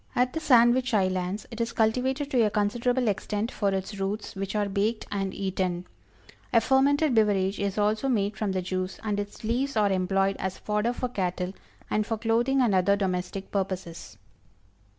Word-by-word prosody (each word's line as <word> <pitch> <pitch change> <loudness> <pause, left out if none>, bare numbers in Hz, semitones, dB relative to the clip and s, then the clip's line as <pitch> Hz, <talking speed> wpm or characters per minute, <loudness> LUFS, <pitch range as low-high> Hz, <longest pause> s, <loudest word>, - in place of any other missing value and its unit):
At 250 +1 +2
the 320 - -1
Sandwich 245 -3 +4
Islands 185 0 0
it 230 0 -4
is 230 - -2
cultivated 260 +6 0
to 250 - +3
a 215 - +3
considerable 240 +5 0
extent 210 +3 -1
for 200 - 0
its 195 +1 -3
roots, 200 +2 -3
which 195 +1 -4
are 205 -1 +1
baked 210 +3 -1
and 195 -1 -1
eaten. 185 -2 -2 0.7
A 230 - +6
fermented 275 +4 +3
beverage 205 -3 +2
is 200 0 -2
also 215 +5 +1
made 205 -4 0
from 210 -3 -1
the 185 -1 -1
juice, 185 +1 -3
and 210 -2 -1
its 205 +2 -6
leaves 245 +3 -1
are 205 -2 +3
employed 195 +1 +1
as 190 0 -3
fodder 210 +3 -1
for 250 - -2
cattle, 180 -3 -2 0.3
and 215 - +1
for 225 +1 -3
clothing 235 +4 +2
and 235 -5 +3
other 190 +2 +4
domestic 190 -1 -3
purposes. 180 - -4
205 Hz, 175 wpm, -27 LUFS, 190-235 Hz, 0.7 s, A